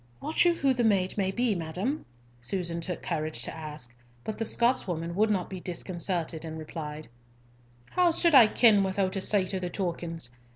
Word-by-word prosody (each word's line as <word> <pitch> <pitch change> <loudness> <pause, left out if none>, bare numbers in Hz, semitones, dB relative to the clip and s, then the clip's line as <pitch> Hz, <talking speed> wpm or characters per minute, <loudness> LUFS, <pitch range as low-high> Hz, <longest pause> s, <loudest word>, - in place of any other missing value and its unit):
"Wot 315 - +1
you 345 -1 +4
who 275 -4 +2
the 245 -1 0
maid 195 -4 +2
may 195 -2 0
be, 235 +3 +1
madam?" 180 - -3 0.3
Susan 170 +6 -3
took 180 0 -4
courage 155 -7 -2
to - - -5
ask; 150 -6 -7 0.3
but 215 - -5
the 225 - 0
Scotswoman 180 -9 +1
would 215 +4 +2
not 190 -4 0
be 190 - -7
disconcerted, 175 -2 -2
and 160 -1 -6
replied, 155 -1 -7 0.8
"How 360 -1 +3
suld 335 0 +3
I 250 -5 +9
ken 215 -2 +5
without 190 0 -1
a 195 - -2
sight 195 -1 +1
of 190 - -2
the 180 - -3
tokens? 170 -7 -4
185 Hz, 180 wpm, -28 LUFS, 165-215 Hz, 0.8 s, I